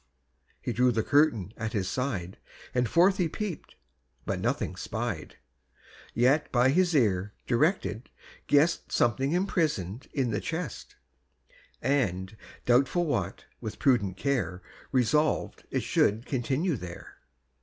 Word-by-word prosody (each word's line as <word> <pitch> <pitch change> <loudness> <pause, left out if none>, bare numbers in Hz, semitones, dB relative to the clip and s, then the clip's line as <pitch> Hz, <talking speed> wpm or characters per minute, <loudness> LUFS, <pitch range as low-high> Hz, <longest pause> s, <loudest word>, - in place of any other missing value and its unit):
He - - -2
drew 125 +1 +3
the 110 -2 0
curtain 130 - +2
at 110 -1 -3
his 95 -3 -1
side, 95 -6 -3 0.3
And 125 -2 +1
forth 185 +3 +4
he 175 -3 +1
peep'd, 200 -1 -5 0.5
but - - -2
nothing - - -1
spied. - - -4 0.8
Yet, 135 +6 +3
by 125 +1 +4
his 175 +3 +3
ear 105 -6 +2
directed, 125 - 0 0.4
guess'd 150 +4 +3
Something 135 +5 +2
imprison'd 150 - -1
in 130 -5 0
the 105 - -1
chest, 160 -7 -5 0.9
And, 110 -7 0 0.3
doubtful 135 +8 +3
what, 100 - -2
with 110 -3 -6
prudent 120 -10 +2
care 100 - -1 0.3
Resolved 150 +4 +1
it - - -1
should 110 +4 +2
continue 135 +5 0
there. 90 -2 -9
125 Hz, 125 wpm, -28 LUFS, 105-150 Hz, 0.9 s, forth